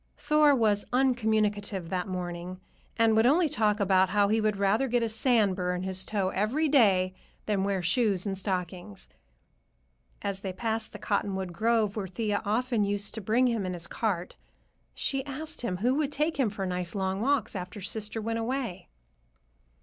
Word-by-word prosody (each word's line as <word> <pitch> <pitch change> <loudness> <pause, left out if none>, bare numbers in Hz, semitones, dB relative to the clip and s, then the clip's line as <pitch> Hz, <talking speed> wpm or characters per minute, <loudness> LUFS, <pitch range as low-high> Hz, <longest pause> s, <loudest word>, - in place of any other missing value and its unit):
Thor 300 -1 +4
was 210 -4 +2
uncommunicative 215 -7 +1
that 180 +1 -2
morning, 180 0 -5 0.4
and 225 -1 +4
would 220 +2 +5
only 325 +5 +4
talk 215 -7 +1
about 190 -1 +3
how 205 +1 +3
he 220 +1 +2
would 215 -1 +1
rather 200 +6 +2
get 245 -1 +1
a - - +1
sand 220 -3 +2
bur 180 -1 -1
in 180 - -4
his 190 0 -2
toe 200 -3 -1
every 230 +12 0
day 195 -10 +4 0.3
than 200 -3 0
wear 195 -2 -1
shoes 195 0 +2
and 195 -1 -2
stockings. 180 - -4 1.2
As 200 -1 -2
they 190 -1 -5
passed 225 +2 -2
the 210 - -8
cottonwood 195 -3 -2
grove 220 +1 +1
where 205 -3 -3
Thea 205 +2 -2
often 225 +1 0
used 205 0 -1
to 220 - -5
bring 225 +6 +2
him 230 -4 0
in 185 -1 -3
his 175 -1 -3
cart, 190 -3 -3 0.6
she 270 -1 -1
asked 310 +3 -5
him 185 -7 -2
who 240 +7 +1
would 295 -2 0
take 300 +2 -1
him 250 -5 +3
for 200 -1 -4
nice 180 0 -3
long 190 0 -1
walks 275 0 +1
after 180 +2 -6
sister 210 +3 -3
went 225 +1 -2
away. 230 -7 -3
210 Hz, 180 wpm, -28 LUFS, 190-230 Hz, 1.2 s, would